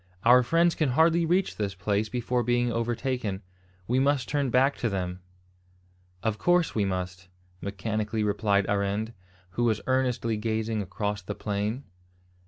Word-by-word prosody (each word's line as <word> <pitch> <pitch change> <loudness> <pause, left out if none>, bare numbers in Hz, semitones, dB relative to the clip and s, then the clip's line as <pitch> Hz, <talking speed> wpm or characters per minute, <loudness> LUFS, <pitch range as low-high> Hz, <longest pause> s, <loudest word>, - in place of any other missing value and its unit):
"Our 125 +2 +7
friends 165 +7 +3
can 155 -4 0
hardly 165 +1 +4
reach 180 +3 +1
this 100 -2 -2
place 100 +3 -1
before 125 +1 -1
being 120 0 +1
overtaken. 115 -3 -2 0.4
We 125 +2 +2
must 135 -2 +2
turn 140 -2 0
back 130 +3 +3
to 115 - -1
them." 90 -2 -3 1.0
"Of 110 -1 -1
course 175 -1 +2
we 105 -3 +1
must," 90 -1 -4 0.3
mechanically 105 +2 -2
replied 100 -1 +2
Arend, 100 +3 -1 0.4
who 120 +6 -1
was 110 -2 +2
earnestly 125 -4 0
gazing 110 0 -1
across 105 +2 -3
the 100 +2 -6
plain. 105 +5 -2
110 Hz, 145 wpm, -27 LUFS, 100-125 Hz, 1.0 s, Our